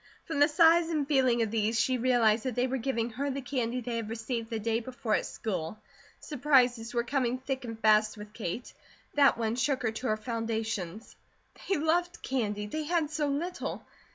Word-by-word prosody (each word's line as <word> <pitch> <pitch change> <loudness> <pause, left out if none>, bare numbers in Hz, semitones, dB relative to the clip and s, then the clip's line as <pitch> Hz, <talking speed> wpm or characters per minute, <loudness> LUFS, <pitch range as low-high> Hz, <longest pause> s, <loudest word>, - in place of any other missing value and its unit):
From 320 -3 -3
the 290 - +7
size 330 +2 +5
and 300 -4 0
feeling 255 -5 +3
of 220 - -3
these, 225 0 +1
she 255 -1 +2
realized 230 -2 +3
that 255 -3 -2
they 245 - +2
were 260 +1 -1
giving 235 -2 -1
her 275 +5 -2
the 275 0 -2
candy 250 -2 -2
they 235 0 -3
had 225 -2 -4
received 225 0 -4
the 230 - -2
day 225 +1 0
before 240 -2 -3
at - - +1
school. 185 -3 -4 0.4
Surprises 250 -5 +2
were 235 -1 0
coming 255 -1 0
thick 265 0 -4
and 225 -1 -6
fast 215 0 +4
with 210 0 -10
Kate. 225 +2 -5 0.4
That 280 -4 +5
one 225 -1 -1
shook 260 +1 0
her 225 - +1
to 240 +4 -4
her 215 - +1
foundations. 225 -3 -3 0.5
They 390 - +3
loved 345 +3 0
candy. 210 -5 -1
They 310 +9 -4
had 325 -2 0
so 305 -1 0
little! 330 +6 -3
245 Hz, 195 wpm, -29 LUFS, 225-280 Hz, 0.5 s, the